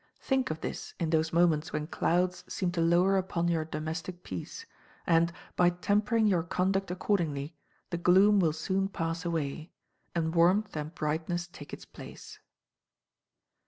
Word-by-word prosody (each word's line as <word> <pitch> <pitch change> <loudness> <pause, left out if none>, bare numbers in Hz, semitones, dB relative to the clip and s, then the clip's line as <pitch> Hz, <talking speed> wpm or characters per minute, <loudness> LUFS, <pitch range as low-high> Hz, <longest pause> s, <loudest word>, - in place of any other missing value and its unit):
Think 265 -1 0
of 155 0 -4
this - - -5
in 165 -2 -1
those 160 0 +2
moments 165 -2 +2
when 150 0 -2
clouds 180 +3 0
seem 185 -2 -1
to 175 -1 -1
lower 175 +4 +4
upon 175 -2 0
your 165 -2 +1
domestic 160 +3 -5
peace, 455 - -7 0.4
and, 170 0 +3 0.2
by 175 -1 +5
tempering 205 +5 +1
your 185 -5 +3
conduct 190 +3 0
accordingly, 165 -5 -1 0.4
the 170 - -2
gloom 195 +4 +5
will 165 -4 +3
soon 190 +5 -1
pass 165 -1 -3
away, 160 -1 -3 0.4
and 160 -1 0
warmth 180 +5 +3
and 155 +2 -5
brightness 165 +3 -2
take 145 -4 -11
its - - -8
place. - - -11
175 Hz, 150 wpm, -30 LUFS, 160-185 Hz, 0.4 s, by